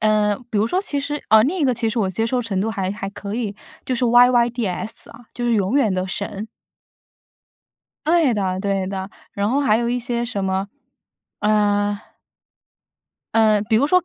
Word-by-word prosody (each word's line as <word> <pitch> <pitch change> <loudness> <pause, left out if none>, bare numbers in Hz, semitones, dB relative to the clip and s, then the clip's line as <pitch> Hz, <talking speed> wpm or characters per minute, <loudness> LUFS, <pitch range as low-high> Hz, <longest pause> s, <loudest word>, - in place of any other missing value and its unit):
呃， 210 -1 +2
比 215 - 0
如 210 - +2
说， 360 +10 0
其 285 -7 -2
实 295 +1 -4
呃， 220 0 +7
另 340 +9 -1
一 310 - +1
个 260 - +3
其 230 -1 -1
实 225 +2 -2
我 195 -4 +1
接 225 +5 -1
受 245 +1 0
程 200 -5 -2
度 220 +3 0
还 190 -3 -2
还 195 -1 -5
可 200 0 -6
以， 220 -4 -3 0.3
就 255 - 0
是 250 +1 0
yyds 240 -4 +2
啊， 230 - -14
就 240 - -4
是 240 -1 +2
永 200 +4 +1
远 235 -8 +3
的 185 0 -1
神。 200 +2 -4 1.6
对 320 -6 +3
的 190 -2 -1
对 195 -1 -1
的， 190 0 -5 0.2
然 200 +1 -1
后 275 +3 +2
还 225 -6 +3
有 235 0 -1
一 245 +1 0
些 240 -1 -2
什 205 -5 -3
么， 190 +1 -1 0.7
呃 205 -1 +2 1.4
嗯， 215 -2 +4
比 225 - +2
如 235 - +4
说， 365 +4 +3
220 Hz, 220 characters per minute, -21 LUFS, 200-245 Hz, 1.6 s, 呃